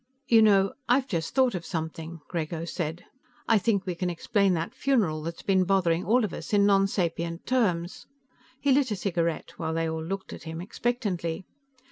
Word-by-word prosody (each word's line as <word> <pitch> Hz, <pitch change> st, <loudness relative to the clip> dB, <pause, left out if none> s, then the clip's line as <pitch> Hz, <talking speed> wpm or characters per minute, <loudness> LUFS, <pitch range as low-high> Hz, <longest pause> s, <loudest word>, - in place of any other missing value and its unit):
"You 225 Hz, -2 st, +6 dB
know, 195 Hz, -3 st, +4 dB, 0.2 s
I've 255 Hz, +2 st, +4 dB
just 165 Hz, -, -3 dB
thought 260 Hz, -3 st, +4 dB
of 180 Hz, -3 st, -4 dB
something," 165 Hz, -1 st, -5 dB
Grego 165 Hz, -1 st, -3 dB
said. 170 Hz, -1 st, -4 dB, 0.4 s
"I 225 Hz, -2 st, +5 dB
think 200 Hz, -2 st, +1 dB
we 180 Hz, -, -2 dB
can 180 Hz, +1 st, -2 dB
explain 190 Hz, +2 st, +1 dB
that 165 Hz, 0 st, -3 dB
funeral 210 Hz, -, +1 dB
that's 165 Hz, +2 st, -6 dB
been 190 Hz, -2 st, +3 dB
bothering 180 Hz, -2 st, +2 dB
all 235 Hz, +2 st, +3 dB
of 200 Hz, -, -6 dB
us -, -, -7 dB
in 200 Hz, -1 st, +5 dB
nonsapient 180 Hz, -4 st, +1 dB
terms." 185 Hz, -9 st, 0 dB, 0.5 s
He 280 Hz, -, +2 dB
lit 270 Hz, -1 st, +3 dB
a 210 Hz, -, -1 dB
cigarette, 170 Hz, -4 st, -1 dB
while 160 Hz, -1 st, -2 dB
they 165 Hz, 0 st, 0 dB
all 160 Hz, 0 st, -3 dB
looked 190 Hz, +3 st, -5 dB
at -, -, -9 dB
him 160 Hz, 0 st, -6 dB
expectantly. 190 Hz, -4 st, -2 dB
180 Hz, 180 wpm, -27 LUFS, 165-205 Hz, 0.5 s, You